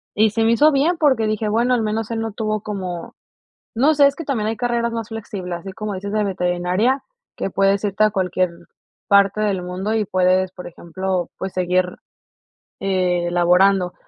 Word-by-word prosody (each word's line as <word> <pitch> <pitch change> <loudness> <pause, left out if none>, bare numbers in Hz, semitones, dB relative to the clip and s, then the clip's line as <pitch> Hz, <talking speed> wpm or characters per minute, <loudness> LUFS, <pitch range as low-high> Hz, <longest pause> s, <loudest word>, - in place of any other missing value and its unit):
Y 215 +1 +4
se 225 +2 0
me 225 - +3
hizo 295 +7 +5
bien, 310 +5 +2
porque 260 -8 +3
dije: 215 0 -1
"Bueno, 240 +4 +2
al 240 - +2
menos 220 +1 -2
él 225 - -2
no 225 -2 -3
tuvo 215 -1 -2
como", 185 -5 -6 0.6
no 280 +7 +3
sé, 285 -1 +6
es 280 - +1
que 330 - -6
también 225 -7 -1
hay 225 - -2
carreras 235 0 -1
más 230 -1 -4
flexibles, 195 -6 -6
así 195 +1 -8
como 215 +1 -5
dices 200 +2 -5
de 215 -1 +1
veterinaria, 185 +7 0 0.3
que - - -3
puedes 195 +2 +1
irte 205 +1 0
a 215 - +3
cualquier 185 -2 0 0.6
parte 200 +1 +4
del 195 -4 0
mundo 185 +4 -3
y 215 -2 0
puedes, 185 0 +2
por 180 - -10
ejemplo, 180 +1 -3
pues 190 0 -5
seguir, 180 0 +1 1.0
eh, 180 -3 0
laborando. 180 +1 +3
200 Hz, 190 wpm, -20 LUFS, 185-225 Hz, 1.0 s, sé